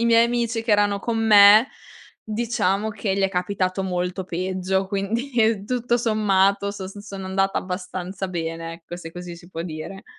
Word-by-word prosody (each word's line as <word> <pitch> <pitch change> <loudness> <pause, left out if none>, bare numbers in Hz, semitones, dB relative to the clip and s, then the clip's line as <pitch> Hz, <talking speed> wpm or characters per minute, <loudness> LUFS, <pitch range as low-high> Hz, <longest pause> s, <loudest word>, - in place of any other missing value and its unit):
I 235 - +1
miei 230 0 +5
amici 235 -1 -1
che 230 - -2
erano 205 -1 +3
con 230 0 -2
me 215 +1 +7 0.6
diciamo 215 -2 -1
che 200 -2 -2
gli 195 - 0
è 195 - +3
capitato 185 0 -1
molto 180 0 -2
peggio. 185 +1 -2
Quindi 220 +2 0
tutto 240 0 0
sommato 200 -3 +2
sos 195 0 -8
son 200 -2 -8
andata 195 +1 0
abbastanza 185 +1 -5
bene 165 -1 -4
ecco, 170 +1 -9
se 165 -2 -9
così 175 0 -8
si 170 +1 -15
può 165 -2 -5
dire. 170 +3 -7
195 Hz, 165 wpm, -23 LUFS, 180-220 Hz, 0.6 s, me